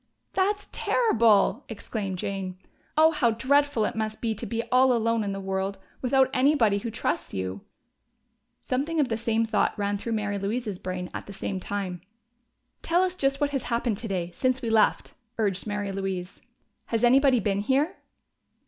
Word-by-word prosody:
"That's 405 +2 +1
terrible!" 230 - +3
exclaimed 205 -3 -4
Jane. 190 -1 -4 0.4
"Oh, 315 +1 +7
how 275 -7 +2
dreadful 260 +1 +2
it - - -3
must 220 0 -3
be 225 -2 -1
to 215 - -6
be 230 0 -2
all 255 +1 +5
alone 230 -1 +1
in 200 - -2
the 195 - -4
world, 195 0 -2 0.2
without 265 0 +3
anybody 255 -7 +3
who 230 - -4
trusts 175 - -2
you!" 95 +1 -3 1.0
Something 290 +6 -1
of 280 -4 +2
the 225 - 0
same 225 0 0
thought 225 - +1
ran 205 0 -1
through 230 +2 -3
Mary 205 -2 -1
Louise's 205 -1 -3
brain 180 -1 -5
at - - -6
the 200 - -8
same 195 0 -4
time. 185 -3 -4 0.8
"Tell 345 +3 +2
us 370 -1 0
just 275 -6 0
what 290 -1 +1
has 275 -3 -2
happened 235 -3 0
today, 185 -6 -3
since 255 +6 +1
we 235 -3 -3
left," 220 -1 +2 0.2
urged 200 -2 -1
Mary 205 -1 -2
Louise. 190 -1 -4 0.5
"Has 230 0 -1
anybody 260 +1 +5
been 200 -1 0
here?" 270 - +1
225 Hz, 170 wpm, -26 LUFS, 200-260 Hz, 1.0 s, Oh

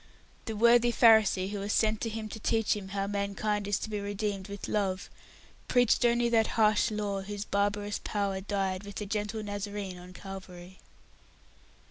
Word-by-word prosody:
The 225 - -4
worthy 235 +2 +5
Pharisee 220 -5 +5
who 205 - -3
was 200 +1 -3
sent 220 -1 +2
to 230 - -1
him 220 0 -5
to 220 - -7
teach 225 0 +1
him 200 -2 -6
how 195 0 -2
mankind 200 +1 -1
is 205 -1 +1
to - - -5
be 210 - -2
redeemed 200 -1 -3
with 200 -1 -6
Love, 195 -3 -1 0.6
preached 245 -1 +3
only 240 0 +3
that 225 -2 +3
harsh 215 +1 +4
Law 205 -2 -2
whose 205 +1 -5
barbarous 205 +1 -1
power 200 -2 -1
died 195 -1 -2
with 205 0 -9
the 210 - -4
gentle 210 +1 -3
Nazarene 205 -2 -5
on 180 +1 -12
Calvary. 185 -1 -10
205 Hz, 170 wpm, -30 LUFS, 195-215 Hz, 0.6 s, worthy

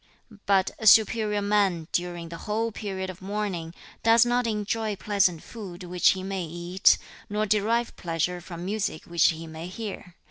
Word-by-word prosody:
But 195 -2 +3
a 220 - -1
superior 215 -1 +5
man, 200 -6 +1
during 175 -1 -2
the 170 - -7
whole 225 +2 0
period 190 -3 -4
of 185 - -15
mourning, 190 -4 -3 0.3
does 230 +1 +6
not 245 0 +1
enjoy 215 0 -1
pleasant 195 -5 +1
food 195 -5 -9
which 180 0 +3
he 190 -1 -6
may 190 -1 -3
eat, 175 +3 +3 0.3
nor 210 +1 0
derive 220 +3 +1
pleasure 175 +1 -2
from 175 -1 -8
music 195 -5 -2
which 170 -1 +3
he 165 -1 -4
may 160 +1 -7
hear. 190 -3 -7
195 Hz, 165 wpm, -26 LUFS, 175-210 Hz, 0.3 s, does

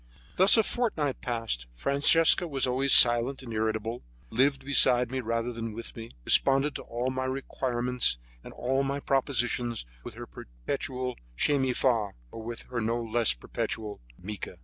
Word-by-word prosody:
Thus 190 +5 +6
a 225 - +4
fortnight 180 - -2
passed. 115 - -3
Francesca 155 - +3
was 140 -4 0
always 130 +2 0
silent 120 +3 +6
and 115 -3 -8
irritable, 110 +2 -2 0.3
lived 135 +2 +1
beside 125 -3 +5
me 130 - -2
rather 115 +1 -3
than 115 -1 -6
with 115 +2 -9
me, 115 0 -8 0.2
responded 135 +2 +3
to - - -9
all 120 +2 -4
my 130 0 -3
requirements 125 - -1 0.3
and - - -11
all 130 +2 -1
my 140 +1 -2
propositions 120 - -1 0.2
with - - -9
her - - -8
perpetual 125 - -6 0.2
Che 145 - +2
mi 130 -1 0
fa, 115 -6 0 0.2
or 115 - -9
with 115 +1 -6
her 120 -2 -2
no 115 +2 -1
less 115 - +1
perpetual 105 - -5 0.2
Mica. 100 +2 -8
125 Hz, 160 wpm, -27 LUFS, 115-135 Hz, 0.3 s, Thus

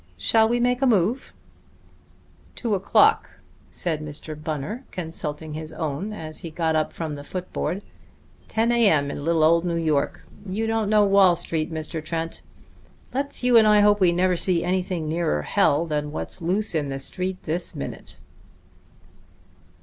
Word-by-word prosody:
Shall 220 - +3
we 240 +1 +1
make 245 +1 +1
a 270 - +4
move?" 225 +3 +1 1.2
"Two 230 -4 -2
o'clock," 405 - +3 0.3
said 160 -4 -2
Mr. 150 +1 -6
Bunner, 155 - -5
consulting 160 -3 -5
his 155 0 -6
own 155 +5 -4
as 155 -7 -6
he 165 - -6
got 160 0 -1
up 155 -1 0
from 160 -3 -5
the 145 -1 -7
foot 180 +4 -7
board. 195 +4 -2 0.6
"Ten 225 +2 +1
A. 235 -3 +4
M. 145 -4 +2
in 145 - -6
little 165 0 +2
old 165 +2 +4
New 175 -1 -1
York. 155 -4 -1 0.2
You 205 +3 -3
don't 225 -2 0
know 210 -1 +5
Wall 195 -3 +5
Street, 160 -1 -2
Mr. 160 0 -4
Trent. 165 +1 -4 0.7
Let's 275 0 -2
you 250 -1 +5
and 220 -1 +6
I 210 -1 +6
hope 205 0 +4
we 180 -3 +4
never 180 +1 +2
see 175 -1 +2
anything 180 -2 -1
nearer 155 - 0
hell 145 - +2
than 150 -2 -2
what's 155 - -5
loose 190 +5 -1
in 150 -3 -1
the 135 - -3
Street 185 +7 -3
this 170 +3 -3
minute." 70 - -7
170 Hz, 165 wpm, -24 LUFS, 155-205 Hz, 1.2 s, and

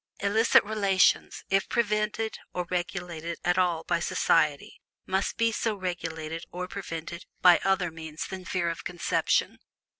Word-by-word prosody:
Illicit 215 +4 +4
relations, 200 -3 +2
if 195 0 +2
prevented 215 -1 0 0.2
or 180 0 -1
regulated 175 -2 -3
at 175 +1 +3
all 175 -3 +1
by 170 - 0
society, 155 -3 +1 0.2
must 190 +1 -1
be 230 0 +3
so 225 0 -1
regulated 165 -4 -4
or 180 +1 -4
prevented 170 -3 -6 0.2
by 180 -1 +8
other 190 -3 +1
means 160 -1 -6
than 190 -1 -7
fear 180 -1 -1
of 165 - -7
conception. 175 -1 0
180 Hz, 140 wpm, -28 LUFS, 165-200 Hz, 0.2 s, by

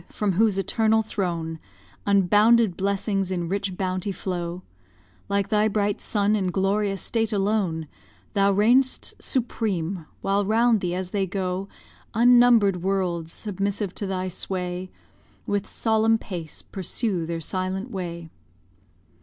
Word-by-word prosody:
from 210 -2 -1
whose 205 +1 +2
eternal 220 +3 +2
throne 170 -6 -3 0.5
Unbounded 205 +2 +4
blessings 195 0 -1
in 175 -2 -2
rich 195 0 -2
bounty 185 +1 -2
flow, 180 -1 -4 0.7
Like 200 0 0
thy 210 0 +3
bright 205 -1 0
sun 205 0 +1
in 195 -3 0
glorious 195 +1 0
state 225 -1 0
alone, 195 -6 0 0.5
Thou 200 -1 +3
reign'st 240 +7 +2
supreme, 195 - -2
while 200 +1 +1
round 225 +1 +3
thee 180 -1 -1
as 185 0 -4
they 195 -2 0
go, 185 +1 -3 0.5
Unnumber'd 240 -4 +6
worlds, 180 -3 -1
submissive 200 -1 -3
to 200 - -3
thy 185 -1 -2
sway, 180 0 -3 0.6
With 205 -1 -1
solemn 225 0 +2
pace 170 -8 -7
pursue 190 -2 -2
their 165 0 -3
silent 185 - -3
way. 170 -4 -5
195 Hz, 125 wpm, -25 LUFS, 180-210 Hz, 0.7 s, Unnumber'd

